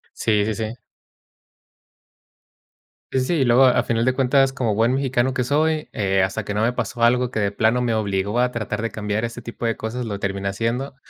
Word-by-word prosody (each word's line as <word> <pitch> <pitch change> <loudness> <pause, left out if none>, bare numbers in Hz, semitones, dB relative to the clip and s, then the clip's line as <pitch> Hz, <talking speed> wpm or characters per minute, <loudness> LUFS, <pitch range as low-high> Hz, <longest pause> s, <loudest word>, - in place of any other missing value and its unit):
Sí, 105 -2 +1
sí, 110 - -1
sí. 110 +3 -5 2.3
Sí, 130 - +2
sí, 130 - 0
sí, 175 - -1
y - - +3
luego, 125 +2 +5
a 125 - +4
final 115 0 0
de 130 - +2
cuentas, 135 +1 +2
como 120 -5 -1
buen 115 +4 +2
mexicano 130 -1 0
que 125 - 0
soy, 155 +4 0
eh, 95 -2 +1
hasta 95 +3 -2
que 105 - -3
no 105 - 0
me 115 +2 +2
pasó 120 -1 -3
algo 125 +1 +3
que 110 -3 -2
de 100 -1 0
plano 110 +4 +1
me 120 -2 0
obligó 100 0 -1
a 125 0 +2
tratar 110 -2 -3
de 115 - -2
cambiar 105 +1 -2
ese 115 +1 -7
tipo 115 0 -6
de 115 -1 0
cosas, 120 +3 -4
lo 105 -3 -4
terminé 100 0 -3
haciendo, 115 +7 -2
115 Hz, 215 wpm, -22 LUFS, 105-125 Hz, 2.3 s, luego